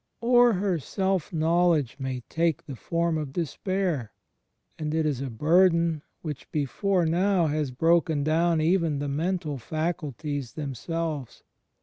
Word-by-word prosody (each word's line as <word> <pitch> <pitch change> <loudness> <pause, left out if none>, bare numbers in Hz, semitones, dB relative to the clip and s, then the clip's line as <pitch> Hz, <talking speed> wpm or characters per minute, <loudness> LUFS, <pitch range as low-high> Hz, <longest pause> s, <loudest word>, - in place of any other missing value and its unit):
Or 240 0 +5
her 185 -3 0
self 190 +3 -1
knowledge 165 -5 +2
may 130 -2 -3
take 165 +4 -1
the 135 - -7
form 170 +4 -1
of 145 -3 -5
despair; 175 - -2 0.7
and 155 0 -2
it 160 -1 +1
is 140 -4 -1
a 135 - -3
burden 165 +4 +3 0.2
which 150 -3 -6
before 170 +6 0
now 180 +2 +2
has 150 -2 0
broken 160 +2 +2
down 165 +2 +2
even 165 -2 +2
the 145 +1 -3
mental 155 0 -2
faculties 150 -3 -3
themselves. 150 0 -4
160 Hz, 130 wpm, -26 LUFS, 145-175 Hz, 0.7 s, Or